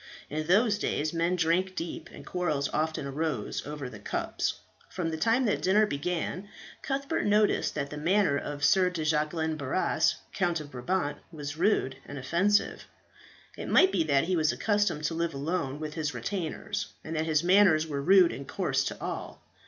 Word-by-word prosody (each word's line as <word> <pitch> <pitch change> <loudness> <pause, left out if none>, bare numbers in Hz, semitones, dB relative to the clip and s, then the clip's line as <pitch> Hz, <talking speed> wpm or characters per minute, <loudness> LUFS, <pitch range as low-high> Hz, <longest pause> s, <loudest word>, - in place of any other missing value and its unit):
In 155 +1 -3
those 205 +3 +3
days 155 -4 -1
men 170 +2 +1
drank 180 +2 +1
deep, 165 0 -5
and - - -11
quarrels 155 -6 -1
often 155 -1 -1
arose 140 -4 -2
over 145 -3 -5
the 110 -4 -10
cups. - - -2 0.3
From 175 -3 -3
the - - -2
time 230 +9 +2
that 210 - +2
the - - -11
dinner 205 +3 +4
began, 180 +4 -3 0.3
Cuthbert 275 0 -2
noticed 210 0 +2
that 140 - -3
the 150 - -5
manner 180 0 +2
of 145 0 -4
Sir 185 +4 +5
de 165 -4 -4
Jacquelin 155 +1 0
Barras, 140 +5 +1 0.2
Count 175 -4 0
of 145 -1 -9
Brabant, 145 +5 -2
was 145 -2 -6
rude 160 -7 +1
and 145 - -7
offensive. 175 +10 +1 0.7
It - - -6
might 375 - +6
be 175 - +2
that 140 -3 +3
he 185 +2 0
was 155 -2 +2
accustomed 205 -8 0
to 150 - 0
live 165 -2 -2
alone 145 -1 -2
with 155 -1 -5
his 155 -2 -3
retainers, 185 -6 -3 0.2
and 160 - -5
that 160 +1 -1
his 155 0 +2
manners 180 -4 +5
were 145 -3 -3
rude 185 +3 +6
and 140 - -7
coarse - - 0
to - - -4
all. - - -5
160 Hz, 185 wpm, -28 LUFS, 150-185 Hz, 0.7 s, might